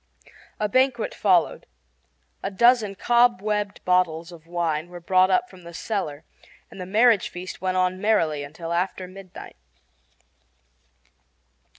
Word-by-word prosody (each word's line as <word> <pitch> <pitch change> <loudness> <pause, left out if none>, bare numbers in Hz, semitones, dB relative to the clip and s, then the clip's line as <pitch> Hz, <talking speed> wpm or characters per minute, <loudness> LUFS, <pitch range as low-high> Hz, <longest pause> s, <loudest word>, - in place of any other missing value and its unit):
A 210 - +1
banquet 255 +1 +1
followed. 180 -5 +1 0.7
A - - -2
dozen 220 0 +3
cobwebbed 210 -3 +1
bottles 175 -2 +1
of 165 -1 -14
wine 170 -2 -2
were 175 0 -9
brought 185 +1 +3
up 190 +6 +2
from 185 -4 -16
the 170 -1 -11
cellar, 165 -9 -4 0.5
and 190 - -9
the 180 - -6
marriage 220 0 +4
feast 180 +1 -8
went 185 0 -1
on 185 0 0
merrily 165 -9 +1
until 165 +4 -6
after 185 +1 -2
midnight. 185 0 -12
185 Hz, 125 wpm, -24 LUFS, 170-210 Hz, 0.7 s, marriage